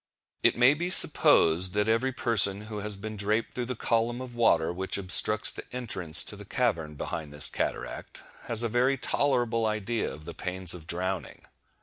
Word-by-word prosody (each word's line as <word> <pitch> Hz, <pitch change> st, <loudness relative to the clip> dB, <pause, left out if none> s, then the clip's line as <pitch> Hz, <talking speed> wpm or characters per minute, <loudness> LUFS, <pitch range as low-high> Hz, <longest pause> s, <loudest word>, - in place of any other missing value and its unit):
It -, -, +2 dB
may 125 Hz, +3 st, +5 dB
be 175 Hz, +4 st, -4 dB
supposed 90 Hz, -, +4 dB
that 105 Hz, +1 st, -1 dB
every 115 Hz, +4 st, 0 dB
person 105 Hz, -6 st, +2 dB
who 105 Hz, 0 st, -8 dB
has 105 Hz, 0 st, -1 dB
been 110 Hz, +2 st, -8 dB
draped 105 Hz, +3 st, -2 dB
through 125 Hz, -1 st, -5 dB
the 125 Hz, -, -5 dB
column 115 Hz, +1 st, -2 dB
of 130 Hz, -1 st, -9 dB
water 85 Hz, -9 st, +1 dB
which 95 Hz, +2 st, -3 dB
obstructs 105 Hz, +3 st, +3 dB
the -, -, -9 dB
entrance 95 Hz, -10 st, +3 dB
to -, -, -4 dB
the 105 Hz, -, -12 dB
cavern 95 Hz, -9 st, -3 dB
behind 75 Hz, +1 st, -7 dB
this 75 Hz, +1 st, +5 dB
cataract, -, -, -6 dB, 0.2 s
has 115 Hz, 0 st, +5 dB
a -, -, 0 dB
very 125 Hz, +4 st, 0 dB
tolerable 120 Hz, -4 st, 0 dB
idea 110 Hz, +2 st, -3 dB
of 75 Hz, -, -12 dB
the -, -, -8 dB
pains 90 Hz, -1 st, 0 dB
of 85 Hz, -3 st, -12 dB
drowning. 95 Hz, +2 st, -5 dB
105 Hz, 185 wpm, -26 LUFS, 95-120 Hz, 0.2 s, may